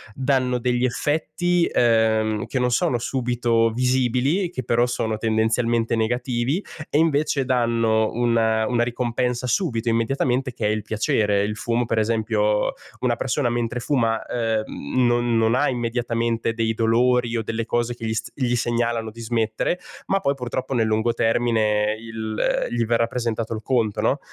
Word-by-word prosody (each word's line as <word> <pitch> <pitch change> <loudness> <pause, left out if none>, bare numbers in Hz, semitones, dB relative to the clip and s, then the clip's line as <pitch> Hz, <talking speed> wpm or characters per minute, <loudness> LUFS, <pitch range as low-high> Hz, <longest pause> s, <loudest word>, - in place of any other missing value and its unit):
danno 130 -2 +1
degli 125 0 0
effetti, 165 +6 0
ehm, 110 -2 +2
che - - -3
non 125 0 +1
sono 120 +1 +1
subito 120 -2 +1
visibili, 130 - +1
che 130 -7 -5
però 120 +1 +2
sono 110 -3 -2
tendenzialmente 115 +1 +1
negativi 120 - -1 0.3
e - - +1
invece 150 -3 +2
danno 115 -3 +1
una 115 -2 +2
una 120 0 +1
ricompensa 120 +1 -1
subito, 120 - 0
immediatamente, 125 +3 0
che 115 - -3
è - - +2
il 110 0 -1
piacere. 105 -1 +1
Il 105 +1 -2
fumo, 120 +2 0
per 115 -1 0
esempio 110 -1 +1 0.3
una 125 -2 +1
persona 130 0 -1
mentre 120 0 -2
fuma, 115 -5 +1
ehm, 115 - -1
non 120 -1 +2
non 115 0 +3
ha 135 +4 +2
immediatamente 115 -2 -1
dei 115 -1 0
dolori 120 +1 +2
o 115 - -2
delle 115 +1 -3
cose 120 +1 0
che 115 - -7
gli 110 - -1
s - - -4
gli 125 -3 0
segnalano 120 -1 -1
di 115 +2 -11
smettere, 115 +8 -1 0.3
ma 195 - +2
poi 140 -7 +1
purtroppo 130 0 -4
nel 115 -3 +2
lungo 110 +2 +1
termine 110 -2 +1
il 110 -1 -2
gli 120 -1 0
verrà 115 +1 +2
presentato 115 -1 -3
il 110 - -5
conto, 115 -4 0
no, - - +1
120 Hz, 160 wpm, -23 LUFS, 110-125 Hz, 0.3 s, non